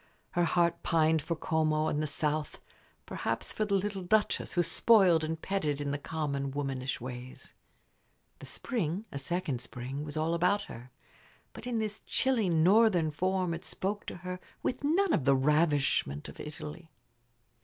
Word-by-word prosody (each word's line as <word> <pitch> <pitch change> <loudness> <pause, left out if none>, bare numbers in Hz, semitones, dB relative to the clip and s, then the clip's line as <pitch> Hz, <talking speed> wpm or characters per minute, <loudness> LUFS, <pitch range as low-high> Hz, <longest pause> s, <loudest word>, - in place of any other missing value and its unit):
Her 175 -1 +2
heart 170 0 +2
pined 160 -1 +3
for 170 - -2
Como 155 -1 +1
and 150 - 0
the 155 - -1
south; 150 +1 -2 0.5
perhaps - - -2
for 215 - -1
the 200 -1 +1
little 195 0 -1
Duchess, 210 +4 +1
who 175 - +3
spoiled 185 -6 +5
and 160 +1 -2
petted 160 -6 -1
her 145 - -4
in 140 - -1
the 145 - -2
common, 140 -3 -2
womanish 135 -1 -3
ways. 125 +1 -8 0.9
The - - -9
spring 200 - -2
a 140 - -4
second 140 -4 -2
spring 130 +4 -5
was 150 0 -6
all 160 +2 +1
about 180 +4 +2
her; 120 -6 -10 0.6
but - - -9
in 240 -2 -1
this 215 -1 -2
chilly 245 -7 +1
northern 175 0 +4
form 185 +2 0
it 165 +2 -6
spoke 205 +3 -3
to - - -5
her 180 0 -4 0.2
with 255 +2 -2
none 345 +6 +3
of 135 - +1
the 140 0 +5
ravishment 145 - +2
of - - -11
Italy. 155 +2 -8
160 Hz, 165 wpm, -30 LUFS, 145-190 Hz, 0.9 s, spoiled